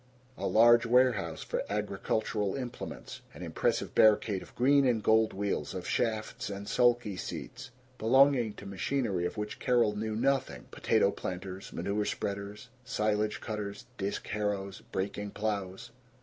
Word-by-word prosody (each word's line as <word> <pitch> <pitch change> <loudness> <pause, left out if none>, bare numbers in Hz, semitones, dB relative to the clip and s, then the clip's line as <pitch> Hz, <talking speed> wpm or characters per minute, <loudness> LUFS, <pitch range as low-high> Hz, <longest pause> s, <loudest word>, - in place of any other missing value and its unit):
A - - -3
large 120 +1 +6
warehouse 115 -9 +2
for - - -2
agricultural 105 0 -1
implements. 125 -3 -6
An - - -8
impressive - - -1
barricade 105 -2 +4
of - - -14
green 140 +3 +4
and 115 -4 +1
gold 110 0 +4
wheels, 95 -5 -2
of 90 - -5
shafts 110 -3 -1
and 100 0 -6
sulky 120 -4 +2
seats, 125 +7 -7 0.3
belonging 125 -1 +4
to - - -11
machinery 100 -2 -1
of 90 - -8
which 105 0 -4
Carol 120 -4 +2
knew 110 +1 -2
nothing 135 +4 0
potato - - +2
planters, 95 +1 -6
manure 100 +4 -1
spreaders, 100 +3 -4
silage 105 -4 0
cutters, 105 -2 -5
disk 100 +1 -3
harrows, 100 -2 -2
breaking 100 +2 -3
plows. 105 0 -3
105 Hz, 135 wpm, -30 LUFS, 100-120 Hz, 0.3 s, large